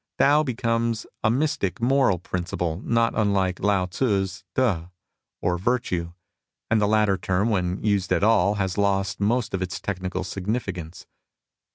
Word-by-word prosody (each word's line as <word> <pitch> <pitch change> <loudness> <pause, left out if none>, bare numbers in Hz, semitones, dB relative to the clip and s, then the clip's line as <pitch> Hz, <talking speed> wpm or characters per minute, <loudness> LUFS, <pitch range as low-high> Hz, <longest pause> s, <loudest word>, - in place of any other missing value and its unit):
Tao 145 +2 +5
becomes 115 -3 -1 0.2
a 110 - +4
mystic 125 - 0
moral 125 -4 +3
principle 90 -1 -3
not 115 0 +2
unlike 100 -4 +1
Lao 100 -2 +2
Tzu's 95 -1 -1
T6, 95 -10 +1 0.5
or 90 -1 +1
"Virtue," 90 -6 -1 0.6
and 110 - +3
the 105 - +3
latter 105 -2 +2
term 95 +4 0
when 90 -2 -1
used 100 -3 +1
at - - +2
all 105 -2 +4
has 95 -1 -2
lost 100 -1 +1
most 110 +3 0
of 95 - -1
its 90 -2 -3
technical 95 -1 -3
significance. 95 -4 -4
100 Hz, 145 wpm, -24 LUFS, 90-115 Hz, 0.6 s, Tao